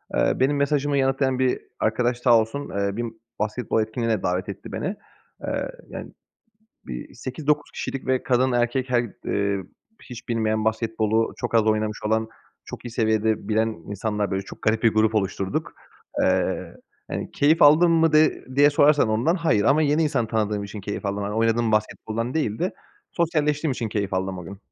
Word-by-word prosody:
eee, - - +3
benim 140 +2 +2
mesajımı 140 0 +1
yanıtlayan 135 -1 +1
bir 130 -1 +2 0.2
arkadaş 120 +3 +1
sağ 120 -2 +5
olsun, 115 +6 -3
eee, 100 0 -2
bir 120 - -1
m 115 - -4 0.3
basketbol 110 +2 0
etkinliğine 110 -1 -1
davet 90 +2 -1
etti 100 - -8
beni. 190 - -3 0.5
Eee, - - -2 0.2
yani, - - -7 0.8
b - - -6
bir - - -7
8-9 145 +3 -2
kişilik 135 - -5
ve 130 -1 +1
kadın, 130 0 +2
erkek 120 +2 0
her 120 -1 +3 0.2
ııı, 100 -1 0 0.4
hiç 120 -3 -10
bilmeyen, 110 -2 0
basketbolu 110 0 0
çok - - -4
az 115 - +6
oynamış 110 -1 +1
olan, 110 +1 +1 0.4
çok - - -9
iyi 120 - -5
seviyede 110 -2 0
bilen 110 +1 +2
insanlar, 105 +2 -3
böyle, 95 0 -1
çok 95 - -12
garip 110 +1 +1
bir 115 -2 +4
grup 110 0 +3
oluşturduk. 95 -2 -1 0.5
Eee, - - 0 0.4
hani, - - -4
keyif 155 +3 +3
aldın 155 +4 +7
mı 165 -1 +3
de 155 +1 +3
diye 145 +1 +6
sorarsan 145 -3 +4
ondan, 115 +10 +2
hayır 165 - +1
ama 145 +6 +4
yeni 150 +2 +2
insan 135 -7 +1
tanıdığım 105 -2 -1
için 100 +1 -7
keyif 100 +1 -5
aldım, 100 +1 -2
hani, 100 +1 -3
oynadığım 115 0 +2
basketboldan 110 +2 -1
değil 110 -9 -1
de 180 +2 -1 0.4
sosyalleştiğim 155 -3 +1
için 120 -3 -3
keyif 100 -2 -2
aldım 95 0 -2
o 90 - -7
gün. 95 +3 -9
115 Hz, 175 wpm, -24 LUFS, 105-135 Hz, 0.8 s, aldın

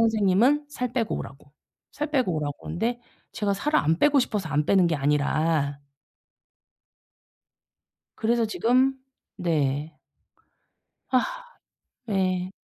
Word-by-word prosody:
선생님은 225 +6 +3
살 250 -4 -4
빼고 235 -3 -1
오라고. 140 0 -9 0.4
살 300 +1 -4
빼고 255 - +1
오라고 145 -2 -3
그러는데 230 +9 -3 0.3
제가 200 -1 -1
살을 300 +10 +1
안 160 +2 +1
빼고 290 +3 +4
싶어서 210 -8 -1
안 150 0 0
빼는 190 -3 +4
게 165 -2 +1
아니라 145 +1 +1 2.4
그래서 230 +1 +1
지금 255 +5 +2 0.4
네. 150 -2 -1 1.2
아. - - 0 0.7
네. 185 -3 0
195 Hz, 215 characters per minute, -25 LUFS, 155-245 Hz, 2.4 s, 빼고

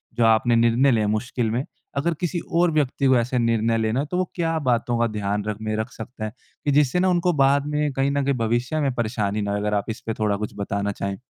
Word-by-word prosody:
जो 120 - +3
आपने 115 +1 +4
निर्णय 120 +4 +4
लिए 110 -3 +2
हैं 105 - 0
मुश्किल 115 +1 -1
में, 120 +4 0 0.3
अगर 170 +5 +1
किसी 175 0 -1
और 170 0 +3
व्यक्ति 140 -2 0
को 130 -1 +5
ऐसे 125 +2 0
निर्णय 115 -1 +2
लेना 110 +3 0
है, 145 - 0
तो 180 +4 -3
वो 185 - +1
क्या 165 -2 0
बातों 120 0 +1
का 115 - +3
ध्यान 105 0 -1
रखने 110 0 -3
रख 110 +3 -3
सकते 115 0 -8
हैं, 110 - -3 0.3
कि 145 - +2
जिससे 145 +4 +3
ना, 185 - +3
उनको 175 0 +2
बाद 140 +1 +3
में 150 0 0
कहीं 135 +1 +1
न 140 0 0
कहीं 140 0 +1
भविष्य 120 +6 0
में 135 -3 +1
परेशानी 110 -3 -1
ना 100 0 -2
हो? 100 - 0
अगर 105 +1 -1
आप 100 - 0
इसपे 115 0 -4
थोड़ा 105 -2 +1
कुछ 105 -1 -5
बताना 100 0 -2
चाहें। 100 +3 -4
120 Hz, 250 wpm, -23 LUFS, 110-140 Hz, 0.3 s, को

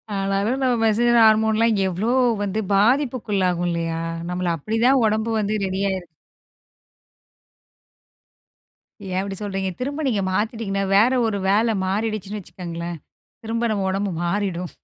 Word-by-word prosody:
ஆனாலும், 195 +6 0
நம்ம 250 -2 +2
மெசெஞ்சர் 235 +2 +3
ஹார்மோன்லாம் 220 +1 +4
எவ்வளோ 195 +6 -1 0.3
வந்து 205 +2 -2
பாதிப்புக்குள்ளாகும் 205 -6 +1
இல்லையா, 165 -1 -2 0.3
நம்மள 180 0 -2
அப்படிதா 225 - +1
உடம்பு 220 +1 0
வந்து, 210 0 -1
ரெடி 190 0 -3
ஆயிருக்கு. 185 -2 -4 3.0
ஏன், 185 0 -2
அப்படி 195 0 -5
சொல்றீங்க? 195 -2 -2
திரும்ப 285 +4 -3
நீங்க 210 -6 0
மாத்திட்டிங்கனா, 205 -1 -1
வேற 225 +6 +5
ஒரு 210 -2 -1
வேல 220 +2 +2
மாறிடுச்சுன்னு 210 0 -2
வச்சுக்கங்களேன், 170 -1 -6 0.5
திரும்ப 230 +1 -1
நம்ம 195 -2 -1
உடம்பு 195 0 -1
மாறிடும். 180 -1 -2
205 Hz, 115 wpm, -22 LUFS, 190-225 Hz, 3.0 s, வேற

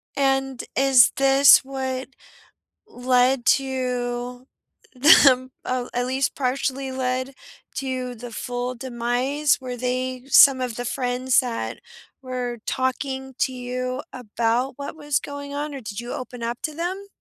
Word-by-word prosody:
and 270 -2 0
is 265 -3 +6
this 275 +1 +7
what 265 -1 -4 0.8
led 255 - +1
to 250 -2 -1 0.5
them 255 -1 +6
uh, 255 -1 -2
at 245 0 0
least 260 +1 -1
partially 270 0 -2
led, 260 +1 -2 0.4
to 255 -2 -3
the 240 +1 -9
full 245 +2 -4
demise? 255 +4 0
Were 250 -1 -6
they 255 +1 -3
some 275 -1 +7
of 250 -3 -3
the 245 - -4
friends 250 0 0
that 245 -3 -4 0.4
were 250 -2 -4
talking 265 +1 -2
to 260 - +1
you 255 0 -4
about 240 +2 -1
what 280 +2 -7
was 295 -2 -1
going 285 0 -7
on, 290 0 -4
or 270 - -6
did 215 -1 -6
you 240 +1 -7
open 250 -1 -7
up 235 +1 -3
to 310 -1 -4
them? 370 +4 -4
255 Hz, 135 wpm, -23 LUFS, 245-270 Hz, 0.8 s, this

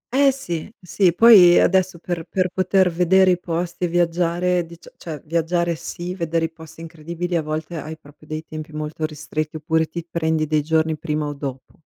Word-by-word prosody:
Eh 275 0 +5
sì, 175 -8 -5
sì, 180 0 +2
poi 195 -7 +8
adesso 185 -1 +2
per 170 -1 -4
per 185 -1 0
poter 185 -1 +2
vedere 185 +2 +4
i 180 - +1
posti 175 +1 -3
e - - 0
viaggiare, 175 +1 +1
dicia 170 +1 -14
cioè 155 -4 -7
viaggiare 170 +1 0
sì, 175 +2 -6
vedere 165 -2 -1
i 165 - -5
posti 160 0 -13
incredibili 170 +2 -5
a 165 - +2
volte 155 +2 -4
hai 155 +1 -7
proprio 150 0 -19
dei 155 +1 -5
tempi 155 0 -8
molto 155 +1 -3
ristretti, 155 0 -5
oppure 160 0 0
ti 170 -1 -7
prendi 160 -2 0
dei 155 0 +1
giorni 160 +1 +1
prima 150 -1 -2
o 145 - -3
dopo. 135 0 -8
165 Hz, 185 wpm, -21 LUFS, 155-175 Hz, -, poi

